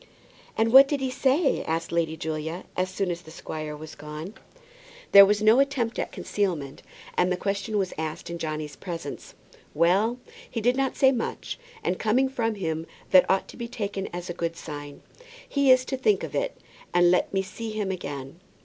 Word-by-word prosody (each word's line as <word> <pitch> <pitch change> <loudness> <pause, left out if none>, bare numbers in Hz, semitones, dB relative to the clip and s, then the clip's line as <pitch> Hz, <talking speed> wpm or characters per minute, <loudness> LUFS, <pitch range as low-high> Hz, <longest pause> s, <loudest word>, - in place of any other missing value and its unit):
"And 225 +1 +2
what 270 +1 +10
did 285 0 -1
he 265 -1 -1
say?" 275 +4 +2
asked 165 +1 -2
Lady 165 -1 0
Julia, 160 +2 -4
as 185 0 0
soon 185 -1 -1
as 175 0 -4
the 160 - -14
squire 155 -1 -6
was 155 +1 -9
gone. 150 +6 -8 0.8
There 200 0 +10
was 210 +1 +1
no 220 +4 +6
attempt 275 -5 0
at - - -2
concealment, 165 -9 -2 0.3
and 180 +1 +2
the 180 - +1
question 200 +3 -2
was 190 -2 -1
asked 160 +1 -4
in 170 0 -5
Johnny's 155 -2 -4
presence. 165 -6 -7 0.4
"Well, 190 +9 +3 0.3
he 235 - -3
did 245 +3 +2
not 270 0 0
say 265 -1 +5
much. 240 -3 -4 0.2
And 185 - -1
coming 250 +5 +2
from 225 -4 -1
him, 160 -4 -3 0.2
that 185 -1 +7
ought 190 - +2
to - - -11
be 235 -1 -4
taken 200 -4 -4
as 175 +1 -6
a 175 - -4
good 170 -1 -3
sign. 145 -2 -8 0.4
He 280 -2 +2
is 255 0 +6
to 265 - -3
think 415 +10 +2
of - - -5
it, - - -1 0.4
and 175 0 +6
let 180 - +2
me 195 -1 0
see 195 +4 -6
him 215 -3 -2
again. 140 -4 -6
190 Hz, 195 wpm, -26 LUFS, 160-230 Hz, 0.8 s, what